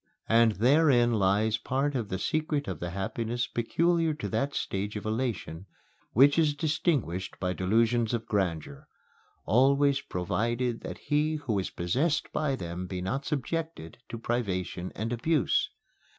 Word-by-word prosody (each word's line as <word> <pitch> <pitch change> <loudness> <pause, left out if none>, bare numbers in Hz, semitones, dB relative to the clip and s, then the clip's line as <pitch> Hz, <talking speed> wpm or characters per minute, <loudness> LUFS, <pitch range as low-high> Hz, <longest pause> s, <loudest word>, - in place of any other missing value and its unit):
And 115 -1 +5
therein 125 - +4
lies 105 +2 +2
part 135 +4 -1
of 115 -6 -2
the 95 - -2
secret 155 - -1
of 90 -6 -4
the 85 - -4
happiness 115 +6 -2
peculiar 165 +6 +1
to 150 - -4
that 140 +1 -1
stage 100 +2 -2
of 105 - -5
elation 110 -6 -3 0.5
which 140 +6 +6
is 150 -3 +3
distinguished 145 - -1
by 90 -1 -1
delusions 115 +5 +2
of 115 -2 -2
grandeur 85 -8 -2 0.6
always 140 +3 +3
provided 115 +6 -1
that - - -6
he 150 +1 0
who 125 -9 -1
is 95 - -3
possessed 140 - -1
by 150 -3 0
them 90 -4 -5
be 90 0 -4
not 130 +11 -3
subjected 155 - -3
to 115 - -5
privation 95 -6 -2
and 115 +3 -2
abuse. 150 +4 +1
120 Hz, 145 wpm, -28 LUFS, 95-145 Hz, 0.6 s, which